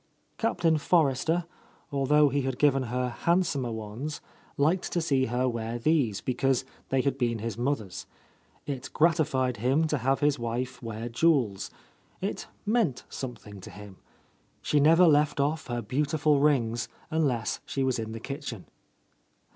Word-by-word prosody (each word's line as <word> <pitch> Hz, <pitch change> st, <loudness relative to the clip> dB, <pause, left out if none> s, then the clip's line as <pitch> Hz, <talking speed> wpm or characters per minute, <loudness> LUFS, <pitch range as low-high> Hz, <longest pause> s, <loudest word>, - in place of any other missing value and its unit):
Captain 170 Hz, -8 st, +2 dB
Forrester, 160 Hz, +2 st, +2 dB, 0.5 s
although 145 Hz, +1 st, +4 dB
he 140 Hz, +1 st, 0 dB
had 130 Hz, -1 st, -2 dB
given 140 Hz, -2 st, +3 dB
her 125 Hz, +1 st, -1 dB
handsomer 145 Hz, -3 st, 0 dB
ones, 110 Hz, +7 st, -5 dB, 0.4 s
liked 165 Hz, +6 st, +1 dB
to 175 Hz, -, +1 dB
see 135 Hz, -5 st, +1 dB
her 125 Hz, +2 st, 0 dB
wear 115 Hz, -1 st, -3 dB
these, 120 Hz, -5 st, +1 dB
be 130 Hz, -, -1 dB
cause 135 Hz, 0 st, +1 dB, 0.2 s
they 135 Hz, -1 st, +2 dB
had 140 Hz, 0 st, -1 dB
been 120 Hz, -2 st, +1 dB
his 110 Hz, -1 st, -4 dB
mother's. 120 Hz, -6 st, -3 dB, 0.6 s
It 135 Hz, -3 st, -5 dB
gratified 150 Hz, -7 st, +2 dB
him 135 Hz, +9 st, +2 dB
to 150 Hz, -2 st, 0 dB
have 135 Hz, +4 st, +1 dB
his 145 Hz, -2 st, +2 dB
wife 125 Hz, +2 st, -3 dB
wear 115 Hz, 0 st, -5 dB
jewels; 115 Hz, -6 st, +1 dB, 0.5 s
it -, -, -4 dB, 0.2 s
meant 210 Hz, -, +1 dB
some 125 Hz, -2 st, -5 dB
thing 100 Hz, -2 st, -12 dB
to -, -, -10 dB
him. 105 Hz, -2 st, -11 dB, 0.7 s
She 150 Hz, -, +2 dB
never 165 Hz, +5 st, +6 dB
left 145 Hz, -1 st, +3 dB
off 155 Hz, +3 st, 0 dB
her 120 Hz, -2 st, -3 dB
beautiful 145 Hz, +5 st, +1 dB
rings 120 Hz, -5 st, +2 dB, 0.2 s
unless 135 Hz, -8 st, 0 dB
she 135 Hz, -, -2 dB
was 130 Hz, -2 st, 0 dB
in 110 Hz, 0 st, -4 dB
the 115 Hz, -, -6 dB
kitchen. 135 Hz, -5 st, -6 dB
135 Hz, 155 wpm, -28 LUFS, 120-150 Hz, 0.7 s, never